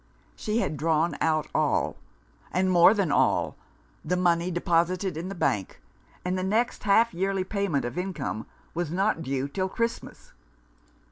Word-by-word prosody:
She 215 Hz, 0 st, -2 dB
had 155 Hz, -, -2 dB
drawn 160 Hz, +2 st, +1 dB
out 155 Hz, -2 st, +1 dB
all, -, -, +1 dB, 0.6 s
and 185 Hz, 0 st, +1 dB
more 175 Hz, +4 st, +7 dB
than 195 Hz, -7 st, +1 dB
all, -, -, +2 dB, 0.5 s
the 180 Hz, -, 0 dB
money 175 Hz, -1 st, +2 dB
deposited 175 Hz, +1 st, +1 dB
in 170 Hz, +4 st, -4 dB
the 195 Hz, -, -5 dB
bank; 105 Hz, -, -1 dB, 0.5 s
and 180 Hz, +1 st, 0 dB
the 185 Hz, -, -1 dB
next 220 Hz, +6 st, 0 dB
half 220 Hz, +2 st, +4 dB
yearly 190 Hz, +2 st, 0 dB
payment 190 Hz, -, -1 dB
of 120 Hz, +9 st, -3 dB
income 160 Hz, -, -4 dB, 0.3 s
was 170 Hz, -2 st, -2 dB
not 190 Hz, +1 st, 0 dB
due 135 Hz, -3 st, -2 dB
until 185 Hz, +7 st, -2 dB
Christmas. 230 Hz, +3 st, -4 dB
180 Hz, 150 wpm, -27 LUFS, 160-195 Hz, 0.6 s, more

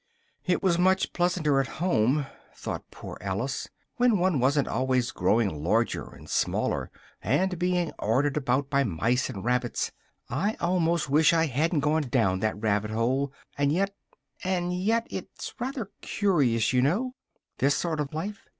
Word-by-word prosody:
"It 180 Hz, +1 st, +1 dB
was 175 Hz, -3 st, +3 dB
much 190 Hz, +1 st, +2 dB
pleasanter 175 Hz, -5 st, +2 dB
at 135 Hz, -, 0 dB
home," 145 Hz, -4 st, +2 dB, 0.3 s
thought -, -, -6 dB
poor -, -, -9 dB
Alice, 100 Hz, +8 st, -3 dB, 0.3 s
"when 245 Hz, -3 st, +4 dB
one 180 Hz, -5 st, +2 dB
wasn't 140 Hz, +3 st, +2 dB
always 130 Hz, 0 st, 0 dB
growing 95 Hz, -5 st, +1 dB
larger 115 Hz, +7 st, +1 dB
and -, -, -14 dB
smaller, -, -, 0 dB, 0.3 s
and 185 Hz, -2 st, +1 dB
being 180 Hz, -2 st, +1 dB
ordered 135 Hz, +6 st, +1 dB
about 135 Hz, -1 st, +1 dB
by 140 Hz, 0 st, +3 dB
mice 115 Hz, +5 st, 0 dB
and 95 Hz, +1 st, -6 dB
rabbits 125 Hz, 0 st, 0 dB, 0.4 s
I 195 Hz, -, -1 dB
almost 170 Hz, -2 st, +1 dB
wish 150 Hz, +4 st, +4 dB
I 165 Hz, -1 st, +3 dB
hadn't 155 Hz, +3 st, +1 dB
gone 150 Hz, -1 st, +1 dB
down 95 Hz, -7 st, +2 dB
that 110 Hz, -1 st, -1 dB
rabbit 105 Hz, -1 st, 0 dB
hole, 130 Hz, +5 st, 0 dB, 0.3 s
and 140 Hz, 0 st, +3 dB
yet, 195 Hz, +5 st, +1 dB, 0.5 s
and 180 Hz, -1 st, 0 dB
yet 220 Hz, +6 st, +1 dB
it's -, -, -6 dB
rather 245 Hz, -5 st, -4 dB
curious, 135 Hz, -, +1 dB
you 125 Hz, -, +4 dB
know, 210 Hz, -, +1 dB, 0.5 s
this 140 Hz, +1 st, +3 dB
sort 160 Hz, +1 st, -1 dB
of 145 Hz, -2 st, -2 dB
life. 200 Hz, +7 st, -5 dB
145 Hz, 155 wpm, -27 LUFS, 125-180 Hz, 0.5 s, when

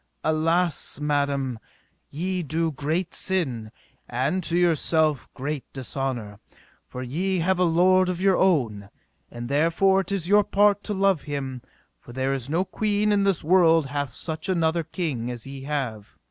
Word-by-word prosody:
Alas, 165 Hz, +1 st, +1 dB
madam, 140 Hz, -4 st, -1 dB, 0.5 s
ye 180 Hz, +4 st, -2 dB
do 160 Hz, +1 st, -1 dB
great 155 Hz, +5 st, -2 dB
sin, 130 Hz, -, -1 dB, 0.4 s
and 135 Hz, +10 st, 0 dB
to 170 Hz, 0 st, 0 dB
yourself 160 Hz, -4 st, +2 dB
great 140 Hz, +1 st, -3 dB
dishonour, 130 Hz, -6 st, -4 dB, 0.5 s
for 125 Hz, -, -6 dB
ye 180 Hz, +9 st, -1 dB
have 180 Hz, +2 st, +1 dB
a -, -, +4 dB
lord 185 Hz, +2 st, +4 dB
of 180 Hz, -1 st, -2 dB
your 190 Hz, 0 st, +3 dB
own, 115 Hz, -, +1 dB, 0.4 s
and 120 Hz, 0 st, -7 dB
therefore 165 Hz, +7 st, +3 dB
it 195 Hz, -, -8 dB
is 190 Hz, -4 st, -1 dB
your 205 Hz, +2 st, +5 dB
part 205 Hz, 0 st, +3 dB
to 210 Hz, -, -2 dB
love 195 Hz, -4 st, +2 dB
him; 135 Hz, -4 st, -5 dB, 0.4 s
for 120 Hz, -, -13 dB
there 130 Hz, +1 st, -1 dB
is 135 Hz, -1 st, -4 dB
no 170 Hz, +5 st, +1 dB
queen 210 Hz, +1 st, 0 dB
in 200 Hz, -1 st, +2 dB
this 195 Hz, -4 st, +1 dB
world 165 Hz, -2 st, +4 dB
hath 145 Hz, 0 st, -3 dB
such 160 Hz, -, -4 dB
another 165 Hz, -2 st, +1 dB
king 155 Hz, -8 st, -3 dB
as 120 Hz, -2 st, -6 dB
ye 135 Hz, 0 st, -8 dB
have. 125 Hz, -8 st, -4 dB
160 Hz, 160 wpm, -25 LUFS, 135-185 Hz, 0.5 s, your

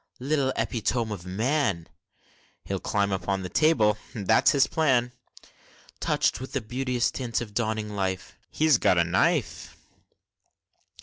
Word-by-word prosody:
Little 135 Hz, 0 st, 0 dB
epitome 115 Hz, -1 st, -1 dB
of 90 Hz, -3 st, -7 dB
man! 110 Hz, -, 0 dB, 0.8 s
(He'll -, -, -3 dB
climb 100 Hz, -1 st, 0 dB
upon 95 Hz, +1 st, -2 dB
the 90 Hz, -, -5 dB
table, 110 Hz, -, +3 dB, 0.2 s
that's 110 Hz, 0 st, +3 dB
his 140 Hz, -2 st, +4 dB
plan!) 130 Hz, -7 st, +1 dB, 0.9 s
Touch'd -, -, 0 dB
with 130 Hz, -, -8 dB
the 135 Hz, -, -1 dB
beauteous 125 Hz, +2 st, -1 dB
tints 120 Hz, -3 st, -2 dB
of 110 Hz, -4 st, -7 dB
dawning 110 Hz, -2 st, -2 dB
life 95 Hz, -2 st, -3 dB
(He's 155 Hz, -6 st, +3 dB
got 90 Hz, -, +3 dB
a 85 Hz, -, +5 dB
knife!) 85 Hz, +2 st, 0 dB
110 Hz, 130 wpm, -26 LUFS, 100-130 Hz, 0.9 s, a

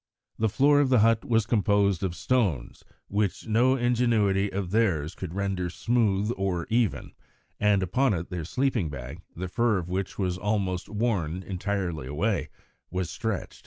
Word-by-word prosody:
The 110 Hz, 0 st, +2 dB
floor 145 Hz, +6 st, +4 dB
of 140 Hz, -2 st, +3 dB
the 125 Hz, -4 st, +5 dB
hut 115 Hz, 0 st, +3 dB
was 115 Hz, -3 st, +2 dB
composed 100 Hz, -4 st, +2 dB
of 95 Hz, -3 st, -2 dB
stones 95 Hz, -, -1 dB, 0.2 s
which 100 Hz, -1 st, -1 dB
no 120 Hz, +4 st, +3 dB
ingenuity 115 Hz, -6 st, +2 dB
of 95 Hz, -2 st, -3 dB
theirs 95 Hz, -8 st, +1 dB
could 90 Hz, -2 st, -7 dB
render 95 Hz, -3 st, -1 dB
smooth 105 Hz, +1 st, +1 dB
or 95 Hz, -3 st, -1 dB
even, 115 Hz, -3 st, 0 dB, 0.5 s
and 105 Hz, -2 st, +3 dB
upon 105 Hz, +5 st, +2 dB
it 85 Hz, +2 st, -5 dB
their 90 Hz, -2 st, -3 dB
sleeping 120 Hz, -, 0 dB
bag, 70 Hz, +4 st, -8 dB
the 90 Hz, +2 st, -4 dB
fur 115 Hz, +3 st, +1 dB
of 90 Hz, -1 st, -4 dB
which 95 Hz, +1 st, -3 dB
was 90 Hz, -3 st, -1 dB
almost 95 Hz, -2 st, -1 dB
worn 100 Hz, -6 st, -1 dB
entirely 90 Hz, -6 st, -3 dB
away, 95 Hz, +10 st, -1 dB, 0.4 s
was 90 Hz, -1 st, -3 dB
stretched. 110 Hz, -5 st, -4 dB
100 Hz, 160 wpm, -27 LUFS, 90-115 Hz, 0.5 s, the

